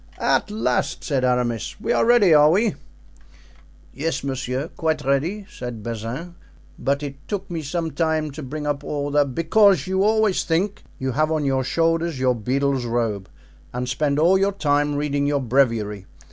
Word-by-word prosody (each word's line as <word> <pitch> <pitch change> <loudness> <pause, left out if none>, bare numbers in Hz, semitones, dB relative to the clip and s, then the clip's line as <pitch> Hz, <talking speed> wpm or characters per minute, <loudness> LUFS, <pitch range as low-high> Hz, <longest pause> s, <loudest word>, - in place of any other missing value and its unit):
"At - - +1
last," 215 +1 -1
said 135 -4 -1
Aramis, 125 - -1
"we - - 0
are - - +3
ready, 225 -8 +6
are 150 0 +7
we?" 205 +5 +2 1.2
"Yes, 155 +3 -2
monsieur, 135 +2 -3
quite 155 -3 -2
ready," 160 +10 0
said 120 - -7
Bazin; 115 +10 -5 0.5
"but 140 +1 0
it 140 -1 -8
took 195 -3 -4
me 165 -2 -3
some 160 +2 -3
time 160 -2 0
to 150 +3 -8
bring 150 +2 -5
up 145 -1 -2
all 145 -1 -3
the——" 145 0 +3
"Because 165 - +3
you 190 +1 +1
always 215 -2 +2
think 185 +5 -1 0.2
you 130 0 -2
have 155 +4 +1
on 155 -2 0
your 135 -1 +1
shoulders 165 +2 0
your 130 -1 +3
beadle's 130 +3 -1
robe, 115 -5 -2 0.4
and 125 +1 -3
spend 140 +3 0
all 175 +5 +4
your 200 +1 +1
time 145 -4 +1
reading 145 -1 0
your 145 -1 +1
breviary. 115 -6 0
145 Hz, 170 wpm, -22 LUFS, 130-165 Hz, 1.2 s, are